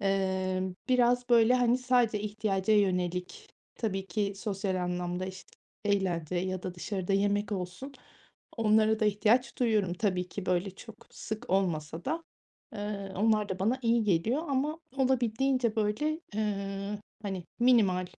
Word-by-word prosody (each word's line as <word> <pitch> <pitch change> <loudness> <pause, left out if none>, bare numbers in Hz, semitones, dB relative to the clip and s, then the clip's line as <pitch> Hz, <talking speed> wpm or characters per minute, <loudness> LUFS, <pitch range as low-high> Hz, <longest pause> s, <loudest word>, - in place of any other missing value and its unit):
Imm, 190 -1 0
biraz 245 0 +3
böyle, 235 +1 +6
hani, 245 0 +3
sadece 245 -4 +2
ihtiyaca 210 -1 0
yönelik 180 - 0 0.3
tabii 195 -4 -2
ki 200 +2 -1
sosyal 195 -2 -2
anlamda, 180 +1 -2
işte, 190 0 -9 0.3
eğlence 185 -5 0
ya 185 0 -2
da 180 -1 -5
dışarıda 190 +1 -3
yemek 205 +1 +1
olsun 190 +9 -5 0.6
onlara 220 0 +3
da 215 - +3
ihtiyaç 220 +5 +2
duyuyorum 215 -7 +2
tabii 180 -2 -1
ki 200 -2 -6
böyle 180 +2 +1
çok 225 +4 -13
sık 220 +3 -6
olmasa 170 -4 0
da, 325 +3 -2 0.5
ııı, 205 -2 -4
onlar 215 0 +2
da 185 - -3
bana 225 +7 +1
iyi 230 -1 +3
geliyor 215 - +1
ama 290 +4 0 0.2
olabildiğince 255 -2 +1
böyle, 225 +10 0 0.2
ııı, 200 -1 -2 0.2
hani, 190 -3 -4 0.2
minimal 200 -8 +4
205 Hz, 135 wpm, -30 LUFS, 185-235 Hz, 0.6 s, böyle